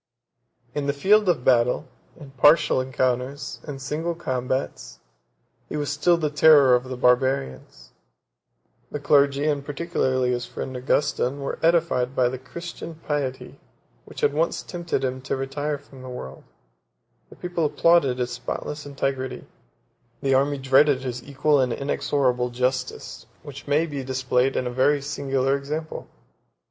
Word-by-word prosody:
In 145 -1 -2
the 140 - +1
field 205 +5 +4
of 145 -8 0
battle, 125 +3 +3 0.3
in 145 -3 -11
partial 140 0 +4
encounters, 130 +2 -2
in 145 -2 -5
single 155 +5 -3
combats, 125 - -3 0.7
he - - -3
was 145 -1 -2
still 170 +5 +3
the 155 -3 -1
terror 150 -3 +6
of 125 +1 +2
the 130 -1 -6
Barbarians: 125 - 0 1.0
the 150 - -5
clergy, 140 0 +3
and 145 -2 0
particularly 135 -4 -1
his 120 -1 -2
friend 130 - -6
Augustin, 140 +1 0
were 140 - -4
edified 165 -6 +2
by 125 -1 +3
the 130 0 -6
Christian 170 +4 -8
piety 145 -4 -4 0.5
which - - -10
had 145 - +2
once 160 +3 0
tempted 170 -6 -3
him 130 0 -2
to 130 - -2
retire 145 +2 -3
from 135 -2 -15
the 130 - -9
world; 95 - -8 0.8
the - - -14
people 175 -2 -3
applauded 150 -3 +3
his 125 -1 -2
spotless 145 +4 -5
integrity; 135 -2 -3 0.7
the 135 -1 +1
army 140 +2 +2
dreaded 135 +1 +4
his 125 -2 -4
equal 145 +1 +1
and 130 -2 +1
inexorable 130 -2 0
justice, 125 +1 -3 0.2
which 140 -1 -10
may 150 +3 +2
be 145 -4 -5
displayed 130 0 0
in 125 - 0
a 125 - -2
very 135 +4 +2
singular 135 -1 -1
example. 150 +3 -5
135 Hz, 145 wpm, -24 LUFS, 130-150 Hz, 1.0 s, terror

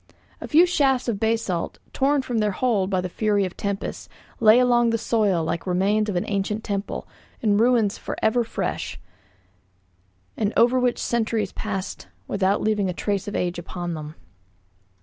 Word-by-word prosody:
A - - -5
few 335 +3 +6
shafts 270 -8 +1
of 220 -4 -1
basalt, 220 -6 -1 0.2
torn 275 0 +2
from 240 -3 -1
their 210 -2 +1
hold 205 -4 +1
by 185 -2 +1
the 180 - -3
fury 205 +1 +1
of 185 - -6
tempests, 200 -1 -4 0.3
lay 220 0 +7
along 240 -1 +4
the 230 - +1
soil 210 -7 +1
like 170 +3 -3
remains 200 +4 +1
of 200 - -2
an 175 - 0
ancient 210 +2 -2
temple, 200 -1 -4 0.3
in 205 -2 +2
ruins 230 -3 +3
for - - -5
ever 225 +2 +2
fresh, 230 - -4 1.4
and 210 0 -1
over 245 +2 +5
which 250 -1 +1
centuries 225 -4 -1
passed 195 -3 -5 0.2
without 200 0 +1
leaving 210 -3 +1
a - - -2
trace 200 +2 -2
of 205 - -4
age 175 -1 -1
upon 175 0 -5
them. 155 -1 -7
210 Hz, 170 wpm, -24 LUFS, 195-235 Hz, 1.4 s, lay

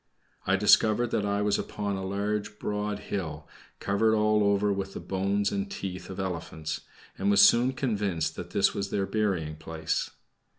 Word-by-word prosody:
I 95 - +4
discovered 110 +3 +4
that 105 - 0
I 100 0 0
was 105 -1 +2
upon 100 -1 -3
a 95 - -4
large 105 +2 -2
broad 105 0 -2 0.2
hill, 80 -5 -4 0.3
covered 110 +2 +2
all 105 0 +3
over 100 0 +2
with 95 0 -4
the - - -4
bones 100 +1 0
and 100 0 -2
teeth 95 -2 -6
of 95 - -7
elephants, 80 -4 -4 0.4
and 100 - +1
was 100 - +6
soon 125 +3 +6
convinced 105 - -1
that - - -7
this - - +2
was 100 0 -3
their 100 -1 0
burying 95 -8 -1
place. 80 0 -2
100 Hz, 170 wpm, -28 LUFS, 95-105 Hz, 0.4 s, was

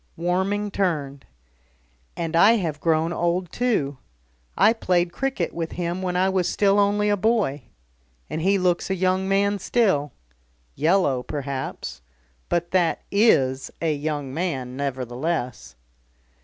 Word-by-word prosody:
Warming 190 +4 0
turned. 150 -8 -2 0.9
"And 165 -1 -2
I 200 +7 +7
have 165 -9 -1
grown 165 +1 +1
old 175 0 -1
too. 150 - -1 0.6
I 215 +3 +5
played 175 -5 0
cricket 270 -10 -2
with 165 -1 -4
him 175 +1 -3
when 180 -1 -2
I 185 +1 +3
was 190 -2 +1
still 200 0 +3
only 205 +1 +2
a 205 - +3
boy. 195 - 0 0.6
And 160 - -4
he 195 +3 +3
looks 180 -1 0
a 190 - +1
young 185 +1 0
man 200 +1 +2
still. 190 -10 +1 0.6
Yellow 155 - +2
perhaps. 140 - -5 0.5
But 175 0 -1
that 180 -3 +1
is 135 - +3
a 160 -2 +1
young 145 -2 -3
man 135 -7 -3
nevertheless." 125 - -3
175 Hz, 130 wpm, -24 LUFS, 145-195 Hz, 0.9 s, I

